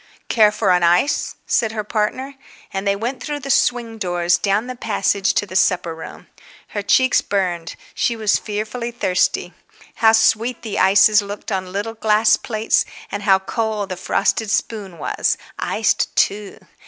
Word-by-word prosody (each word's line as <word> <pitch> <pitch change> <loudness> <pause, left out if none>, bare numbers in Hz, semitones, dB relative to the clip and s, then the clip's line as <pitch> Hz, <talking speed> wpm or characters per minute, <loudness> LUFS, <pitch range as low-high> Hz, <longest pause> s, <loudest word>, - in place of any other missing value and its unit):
"Care 215 -3 +5
for 210 - +1
an 180 0 +3
ice?" 175 +11 +2
said 220 -2 0
her 215 -1 -3
partner. 220 +6 -2 0.4
And 195 +1 -3
they 200 - +2
went 240 +6 -4
through 295 -1 -4
the 275 +1 -2
swing 235 -3 +1
doors, 175 -2 +1
down 205 +3 0
the 255 0 -6
passage, 200 -3 0
to - - +1
the 185 -2 -10
supper 180 -3 +2
room. 160 - -10 0.4
Her 205 - -3
cheeks 260 +5 +3
burned, 180 -4 -2 0.2
she 235 - 0
was 215 -2 +1
fearfully 215 +3 -4
thirsty. 190 -6 0 0.4
How 220 -1 +5
sweet 225 +2 +2
the 220 -3 -3
ices 205 +2 +5
looked 205 +2 -7
on 185 -2 -3
little 205 +4 -3
glass 220 0 +3
plates 220 -1 0 0.3
and 205 - -4
how 195 -2 +4
cold 210 +1 -3
the 185 - -3
frosted 195 +4 0
spoon 200 -4 -2
was, - - -1 0.2
iced - - 0
too! 205 0 0
210 Hz, 165 wpm, -20 LUFS, 195-225 Hz, 0.4 s, Care